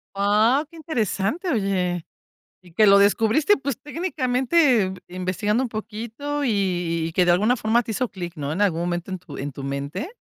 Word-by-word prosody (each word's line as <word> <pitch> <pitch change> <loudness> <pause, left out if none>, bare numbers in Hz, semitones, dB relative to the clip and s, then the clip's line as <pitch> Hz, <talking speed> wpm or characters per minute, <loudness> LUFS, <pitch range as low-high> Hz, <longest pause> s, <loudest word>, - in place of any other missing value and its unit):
¡Ah, 215 +7 +3
qué 335 - -17
interesante, 285 - -2
oye! 185 - 0 0.6
Y 175 - -18
que 215 +5 +4
lo 200 0 +7
descubriste, 225 - +3
pues 275 -3 -3
técnicamente, 265 - +1
eh, 190 0 -4
investigando 185 +6 -1
un 255 - -2
poquito 230 +7 -5
y 260 - +1
y 175 -5 0
y 165 - -8
que 180 +1 +2
de 175 - +5
alguna 210 +8 +3
forma 225 +2 +2
te 230 - -8
hizo 250 +3 -1
clic, 175 -4 -7
¿no?, 145 -1 -4
en 190 +6 0
algún 170 -5 +1
momento 175 +1 -3
en 185 - -3
tu 185 - -11
en 140 +1 -5
tu 135 - -8
mente, 140 - -4
205 Hz, 195 wpm, -23 LUFS, 180-250 Hz, 0.6 s, lo